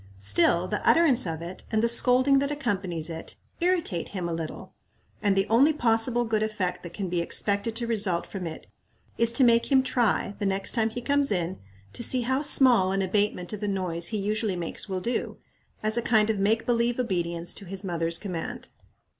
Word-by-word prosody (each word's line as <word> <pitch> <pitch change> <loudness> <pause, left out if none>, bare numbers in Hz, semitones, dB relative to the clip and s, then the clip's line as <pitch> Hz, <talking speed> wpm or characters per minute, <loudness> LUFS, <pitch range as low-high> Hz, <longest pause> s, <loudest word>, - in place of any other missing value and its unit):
Still, 170 - +2
the 210 - -3
utterance 280 - +4
of 165 0 -4
it, 175 +2 -8
and 220 0 +1
the - - +4
scolding 255 +3 +4
that 280 0 -1
accompanies 195 - -3
it, 165 -1 -7 0.2
irritate 340 - 0
him 185 -4 -4
a 170 - -3
little, 165 -1 -6 0.5
and 200 -2 +2
the 195 0 +2
only 270 +8 +4
possible 240 -2 +2
good 220 -1 0
effect 195 -5 -2
that 170 -1 -10
can 195 -3 -3
be 175 -1 -1
expected 200 +5 +1
to 235 0 -2
result 205 -7 -1
from 185 -4 -6
it 160 - -8 0.5
is 230 0 +4
to 260 - +4
make 235 +2 +3
him 265 -1 +5
try, 235 -5 0
the 205 - -2
next 195 0 -1
time 225 -2 +1
he 245 +2 -6
comes 285 +1 +1
in, 180 -1 -2 0.3
to - - -6
see 250 +2 +1
how 260 +3 0
small 245 -10 +4
an 195 0 0
abatement 190 -1 -1
of 210 - -5
the 210 - -3
noise 180 -4 -1
he 220 - -2
usually 210 0 -1
makes 175 +3 0
will 185 -1 -3
do, 240 +6 -3 0.5
as 215 +2 0
a - - +2
kind 220 -2 +3
of 210 - -3
make 220 +3 +1
believe 235 0 +1
obedience 175 -7 -2
to 200 - -9
his 190 +2 -6
mother's 165 -2 0
command. 180 -5 -6
210 Hz, 205 wpm, -26 LUFS, 180-235 Hz, 0.5 s, him